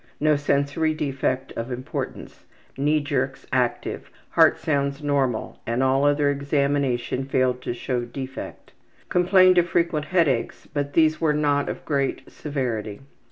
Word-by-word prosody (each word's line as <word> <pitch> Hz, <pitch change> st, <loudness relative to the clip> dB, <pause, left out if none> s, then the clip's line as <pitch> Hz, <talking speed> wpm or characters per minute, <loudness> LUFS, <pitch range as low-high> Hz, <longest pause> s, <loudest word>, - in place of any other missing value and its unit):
No 150 Hz, 0 st, +3 dB
sensory 145 Hz, +2 st, 0 dB
defect 135 Hz, -3 st, -2 dB
of 115 Hz, +3 st, -5 dB
importance. 125 Hz, +1 st, -6 dB, 0.3 s
Knee 150 Hz, +3 st, +1 dB
jerks 135 Hz, -2 st, -2 dB
active. 125 Hz, -2 st, -1 dB, 0.2 s
Heart -, -, +5 dB
sounds 140 Hz, -1 st, -1 dB
normal, 135 Hz, -5 st, -1 dB
and 120 Hz, +3 st, 0 dB
all 135 Hz, +2 st, +3 dB
other 145 Hz, 0 st, +3 dB
examination 140 Hz, -3 st, 0 dB
failed 130 Hz, -2 st, +1 dB
to -, -, -3 dB
show 120 Hz, 0 st, -2 dB
defect. 130 Hz, +2 st, -8 dB, 0.4 s
Complained 185 Hz, 0 st, +5 dB
of 175 Hz, 0 st, +1 dB
frequent 170 Hz, -3 st, +1 dB
headaches, 155 Hz, -9 st, 0 dB
but 145 Hz, -1 st, -4 dB
these 155 Hz, -1 st, +3 dB
were 155 Hz, -2 st, +3 dB
not 145 Hz, -1 st, +1 dB
of -, -, -6 dB
great 140 Hz, -3 st, -2 dB
severity. 120 Hz, -8 st, -4 dB
140 Hz, 135 wpm, -24 LUFS, 130-150 Hz, 0.4 s, Heart